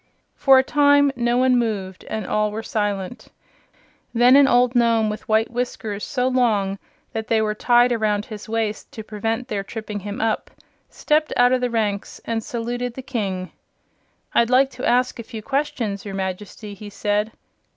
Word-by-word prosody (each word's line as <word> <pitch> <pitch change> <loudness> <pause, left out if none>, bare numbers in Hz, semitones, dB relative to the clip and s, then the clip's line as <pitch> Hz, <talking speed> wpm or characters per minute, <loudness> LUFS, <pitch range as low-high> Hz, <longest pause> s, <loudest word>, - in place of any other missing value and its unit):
For 270 -1 +6
a 260 - +5
time 285 0 +4
no 240 0 +1
one 255 -1 +4
moved 195 -5 -3
and 220 -2 -4
all 215 +2 +1
were 215 +2 -5
silent. 205 0 -3 0.9
Then 245 +3 +6
an 280 -1 +7
old 245 -1 +3
Nome 230 -3 +3
with 220 +4 -8
white 220 +1 +2
whiskers 225 -4 -4
so 250 -2 -1
long 215 -7 +1 0.3
that 220 -1 -4
they 225 - +2
were 215 -1 0
tied 240 +3 +3
around 215 -3 0
his 215 0 -9
waist 220 -2 -2
to 220 - -7
prevent 225 +3 -3
their 205 -5 -3
tripping 215 0 -6
him 205 +1 -6
up, 225 -1 -1 0.4
stepped 305 0 0
out 245 0 +5
of 255 -1 +2
the 250 - 0
ranks 210 -3 -2
and 225 -1 -2
saluted 240 +1 -4
the 265 - -7
King. 195 -8 -3 0.8
"I'd 235 0 +3
like 265 +2 +4
to 250 +1 -2
ask 250 0 +1
a - - -2
few 225 -1 -9
questions, 250 -7 -2
your 200 -2 -6
Majesty," 195 +2 -5
he 205 +1 -10
said. 210 +1 -1
225 Hz, 175 wpm, -22 LUFS, 210-250 Hz, 0.9 s, an